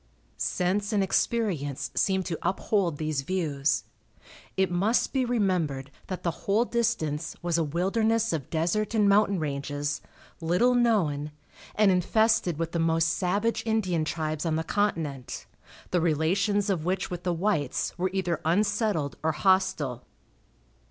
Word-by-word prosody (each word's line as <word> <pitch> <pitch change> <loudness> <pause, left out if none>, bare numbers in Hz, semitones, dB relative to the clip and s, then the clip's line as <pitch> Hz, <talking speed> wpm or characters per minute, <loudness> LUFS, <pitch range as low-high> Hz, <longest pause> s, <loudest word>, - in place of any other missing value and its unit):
Sense 200 +4 0
and 200 -2 +3
experience 150 - 0
seemed 190 -1 +1
to 165 - -3
uphold 185 -2 0
these 155 -2 -1
views. 150 -3 0 0.7
It 190 -1 +2
must 200 +7 +1
be 265 -2 +2
remembered 180 - 0 0.2
that 185 - -5
the 170 - +1 0.2
whole 215 +4 +3
distance 165 -11 -1
was 170 -1 +1
a - - +2
wilderness 220 +7 +1
of 150 -5 -3
desert 185 +7 0
and 210 -2 +4
mountain 200 0 +4
ranges, 145 -1 -3 0.4
little 180 +10 +3
known, 190 -12 +2 0.5
and 210 -2 +5
infested 185 -1 +2
with 165 0 -2
the 170 - -1
most 165 0 +2
savage 200 +7 0
Indian 195 -8 0
tribes 155 -1 -2
on 165 -2 0
the 160 - -1
continent, 160 -10 -2 0.5
the 180 - +2
relations 190 +6 +1
of 170 -5 -1
which 185 +2 -1
with 175 -1 -4
the 180 0 -1
whites 165 -6 -1
were 185 +2 0
either 185 -3 -1
unsettled 200 - +1
or 160 0 +1
hostile. 160 -9 +1
180 Hz, 140 wpm, -27 LUFS, 155-205 Hz, 0.7 s, and